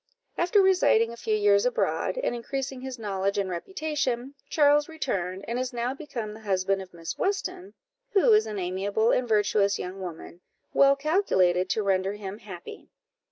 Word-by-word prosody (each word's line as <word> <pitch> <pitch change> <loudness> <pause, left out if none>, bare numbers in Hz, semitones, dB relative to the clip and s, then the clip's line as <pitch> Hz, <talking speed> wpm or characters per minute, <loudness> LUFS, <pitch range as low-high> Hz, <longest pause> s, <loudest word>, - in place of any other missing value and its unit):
After 365 +4 +3
residing 360 -12 +4
a - - -8
few 220 -2 -1
years 205 -1 +4
abroad, 250 - 0
and - - -1
increasing 265 +2 -4
his 260 -1 -6
knowledge 200 -2 -2
and 195 -2 -1
reputation, 280 - -3 0.2
Charles 295 0 +4
returned, 195 - -3
and 235 +2 -2
is 255 -1 -3
now 240 +2 -1
become 245 -7 -6
the 215 - -11
husband 195 -2 0
of 185 -1 -11
Miss 165 -1 -7
Weston, 380 -1 -2 0.4
who 420 +3 +5
is 425 +1 +4
an 210 - -5
amiable 195 +5 0
and 250 - +1
virtuous 210 -2 +2
young 185 +2 -6
woman, 175 -1 -8 0.3
well 275 0 +6
calculated 190 - +2
to 215 - 0
render 195 0 +1
him 205 0 -7
happy. 185 -5 -10
220 Hz, 165 wpm, -27 LUFS, 195-280 Hz, 0.4 s, well